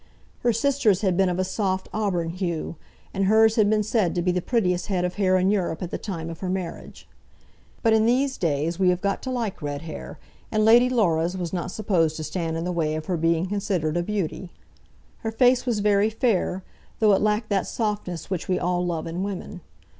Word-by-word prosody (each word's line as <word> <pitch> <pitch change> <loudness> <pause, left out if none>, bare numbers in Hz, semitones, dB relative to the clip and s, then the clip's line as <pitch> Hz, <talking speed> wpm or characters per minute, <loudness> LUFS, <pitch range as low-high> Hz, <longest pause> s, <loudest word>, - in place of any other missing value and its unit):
Her 240 - +2
sister's 230 -5 +2
had 190 -4 +1
been 190 0 +3
of 180 - -1
a 185 - +1
soft 190 -1 -2
auburn 180 -6 -1
hue, 170 -3 -3 0.4
and 195 0 0
hers 220 +2 +5
had 210 -3 +4
been 215 0 +2
said 205 -5 0
to 175 - 0
be 180 - +2
the 180 0 -1
prettiest 180 -6 0
head 180 -3 0
of 180 - -2
hair 185 -2 +2
in 185 +2 +2
Europe 180 -5 -1
at 175 - -5
the - - -3
time 170 -6 -5
of 165 - -9
her 185 - -3
marriage. 185 -2 -5 0.8
But 225 -2 +4
in 220 0 +4
these 265 +3 +2
days 165 +1 -1
we 185 -1 +4
have 180 -1 +1
got 200 +1 -1
to 260 - -5
like 235 -8 -3
red 145 0 -4
hair, 160 - -8 0.3
and 215 -1 +2
Lady 240 +3 +6
Laura's 180 -7 +1
was 175 -1 -4
not 175 -1 -2
supposed 180 -6 0
to 155 - -5
stand 165 +1 -3
in 165 - -3
the 180 - -1
way 160 -3 0
of 155 0 -4
her 180 - -1
being 165 +1 +1
considered 190 -5 -1
a 175 - +1
beauty. 190 -2 -3 0.7
Her 225 - -3
face 250 +2 +3
was 225 -4 0
very 205 0 +3
fair, 215 -5 0 0.3
though 215 -2 +4
it 195 - +2
lacked 215 +1 +1
that 195 -3 0
softness 205 -6 -3
which 185 -3 -3
we 185 - +1
all 180 0 0
love 170 -3 -2
in 165 +2 -4
women. 195 -2 -5
185 Hz, 220 wpm, -24 LUFS, 175-215 Hz, 0.8 s, Lady